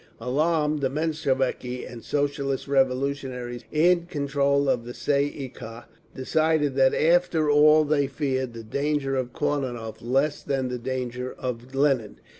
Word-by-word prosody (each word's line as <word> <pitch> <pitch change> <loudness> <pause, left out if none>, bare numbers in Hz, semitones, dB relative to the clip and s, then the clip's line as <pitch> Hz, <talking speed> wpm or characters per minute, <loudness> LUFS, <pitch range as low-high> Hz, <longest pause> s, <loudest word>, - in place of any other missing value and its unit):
Alarmed, 150 +2 +1
the 135 - +1
Mensheviki 135 -4 -1
and 120 -2 -10
Socialist 140 -2 -1
Revolutionaries 130 -2 -1
in 170 +2 +3
control 140 -2 +1
of 125 -3 +1
the 120 +1 -8
Tsay 140 +2 +1
ee 145 -2 -5
kah 115 -1 -10 0.3
decided 155 +1 +1
that 130 0 +3
after 165 -2 +3
all 150 +1 +6
they 145 -2 +1
feared 130 -3 -2
the 115 - -7
danger 140 +3 -1
of 130 -2 -2
Kornilov 130 -6 -2
less 135 +5 0
than 135 -2 -1
the 125 0 -4
danger 125 0 -4
of 125 +1 -5
Lenin. 135 -6 +1
135 Hz, 140 wpm, -25 LUFS, 125-150 Hz, 0.3 s, all